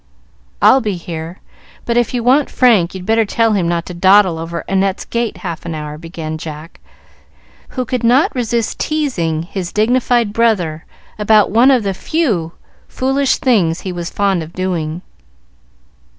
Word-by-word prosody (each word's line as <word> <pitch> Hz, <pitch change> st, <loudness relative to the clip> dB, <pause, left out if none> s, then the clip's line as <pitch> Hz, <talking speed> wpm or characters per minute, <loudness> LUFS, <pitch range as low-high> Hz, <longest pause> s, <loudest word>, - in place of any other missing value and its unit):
"I'll 265 Hz, -, +6 dB
be 210 Hz, -4 st, -2 dB
here, 165 Hz, 0 st, -7 dB, 0.4 s
but 235 Hz, -, -1 dB
if 240 Hz, -2 st, +2 dB
you 245 Hz, -2 st, -2 dB
want 265 Hz, +4 st, +3 dB
Frank, 210 Hz, -9 st, +3 dB
you'd 185 Hz, -1 st, -7 dB
better 225 Hz, +2 st, +3 dB
tell 225 Hz, +1 st, +1 dB
him 185 Hz, -5 st, +1 dB
not 170 Hz, -1 st, -1 dB
to 180 Hz, -, -7 dB
dawdle 185 Hz, -1 st, +4 dB
over 165 Hz, +1 st, -5 dB
Annette's 195 Hz, 0 st, 0 dB
gate 235 Hz, -4 st, -2 dB
half 170 Hz, -2 st, -5 dB
an 170 Hz, -1 st, -5 dB
hour," 150 Hz, 0 st, -6 dB
began 160 Hz, -1 st, -6 dB
Jack, 155 Hz, +1 st, -9 dB, 1.0 s
who 255 Hz, -, 0 dB
could 250 Hz, 0 st, -3 dB
not 250 Hz, +5 st, +3 dB
resist 235 Hz, -2 st, -2 dB
teasing 185 Hz, -, -1 dB
his 180 Hz, 0 st, -5 dB
dignified 235 Hz, 0 st, +1 dB
brother 180 Hz, -9 st, 0 dB, 0.3 s
about 210 Hz, -1 st, +4 dB
one 235 Hz, +5 st, +5 dB
of 255 Hz, -5 st, +3 dB
the 195 Hz, -1 st, -1 dB
few 190 Hz, -, -1 dB, 0.3 s
foolish 270 Hz, +1 st, 0 dB
things 185 Hz, -10 st, +1 dB
he 190 Hz, -, -5 dB
was 175 Hz, -1 st, -5 dB
fond 195 Hz, -3 st, 0 dB
of 160 Hz, +1 st, -9 dB
doing. 175 Hz, -2 st, -3 dB
195 Hz, 160 wpm, -16 LUFS, 170-235 Hz, 1.0 s, I'll